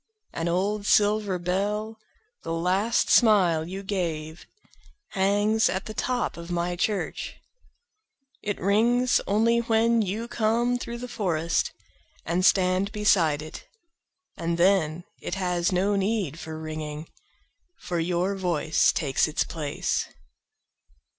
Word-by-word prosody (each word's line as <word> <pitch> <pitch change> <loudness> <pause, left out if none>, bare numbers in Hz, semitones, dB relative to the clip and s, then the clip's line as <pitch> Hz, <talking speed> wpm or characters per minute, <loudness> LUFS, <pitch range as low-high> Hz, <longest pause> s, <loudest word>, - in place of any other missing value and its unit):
An 165 - -2
old 200 +4 -1
silver 210 -2 +3
bell, 205 +5 -2 0.4
the 165 - -5
last 185 +7 +1
smile 180 -9 +4
you 190 +2 -6
gave, 165 -5 -4 0.6
Hangs 205 +3 +2
at 190 +1 -3
the 215 - -6
top 250 -1 -2
of 170 +1 -9
my 175 0 -1
church.It 270 - -6
rings 240 +6 +3
only 230 +3 +3
when 230 0 +2
you 215 +4 -3
come 235 +2 +1
through 235 -1 -5
the 250 +1 -6
forestAnd 170 -2 -3
stand 185 +1 +3
beside 175 -8 +2
it. 155 - -10 0.7
And 170 0 -2
then, 175 -3 +2 0.2
it - - -4
has 180 -2 0
no 195 +3 +1
need 195 -6 -1
for 160 0 -7
ringing, 155 0 -6 0.7
For 175 -1 -3
your 180 +3 0
voice 170 -4 +2
takes 140 -1 +1
its 155 - 0
place. 150 -3 -2
190 Hz, 115 wpm, -26 LUFS, 170-215 Hz, 0.7 s, smile